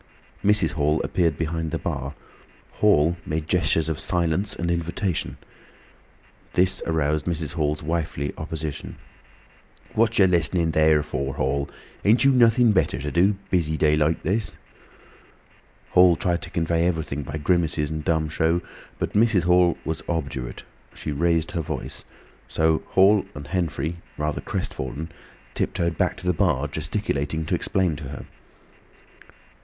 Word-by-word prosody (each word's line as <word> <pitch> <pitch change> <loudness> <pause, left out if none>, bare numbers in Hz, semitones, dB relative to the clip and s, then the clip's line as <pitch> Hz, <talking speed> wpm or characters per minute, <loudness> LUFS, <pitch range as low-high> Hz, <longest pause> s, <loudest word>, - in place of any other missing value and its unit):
Mrs. 105 -1 +3
Hall 75 -1 +1
appeared 85 -5 +1
behind 80 0 -2
the - - -2
bar. 70 +2 -4 0.6
Hall 85 -5 +3
made 75 0 -3
gestures 80 -2 +1
of 80 -3 -2
silence 90 +3 0
and 85 0 -1
invitation. 85 +1 -2 1.2
This 90 +1 +3
aroused 75 -1 0
Mrs. 80 -4 -2
Hall's 75 -2 -1
wifely 75 -3 -2
opposition. 80 -1 -5 1.0
"What 115 +1 +2
yer 100 - +7
listenin' 85 -1 +2
there 80 -1 +4
for, 70 -2 -3
Hall?" 70 +2 0
she - - -20
asked. - - -11
"Ain't 115 +5 +5
you 135 - +6
nothin' 120 -2 +5
better 95 -9 +1
to 75 +1 -4
do—busy 90 -3 +1
day 75 -1 +3
like 75 +1 +1
this?" 100 +5 -1 1.4
Hall 90 -1 +6
tried 85 +1 -1
to - - -6
convey 85 0 +1
everything 80 -4 -2
by 70 +3 -5
grimaces 80 -2 +1
and 80 -1 -4
dumb 80 0 +1
show, 80 +2 +1 0.4
but - - -3
Mrs. 105 -4 +3
Hall 90 0 +4
was 80 0 -3
obdurate. 70 -7 -3 0.3
She 75 - -5
raised 85 +2 +1
her 85 -1 -1
voice. 75 -4 -5 0.4
So 80 0 +1
Hall 100 +2 +5
and 75 - -7
Henfrey, 85 -1 -2 0.2
rather 75 0 -2
crestfallen, 70 +6 -4 0.4
tiptoed 85 -1 -1
back - - 0
to - - -10
the 90 - +2
bar, 75 -3 +1
gesticulating 80 -2 -2
to - - -2
explain 90 -5 +1
to 75 - -8
her. 70 0 -7
80 Hz, 145 wpm, -24 LUFS, 75-90 Hz, 1.4 s, yer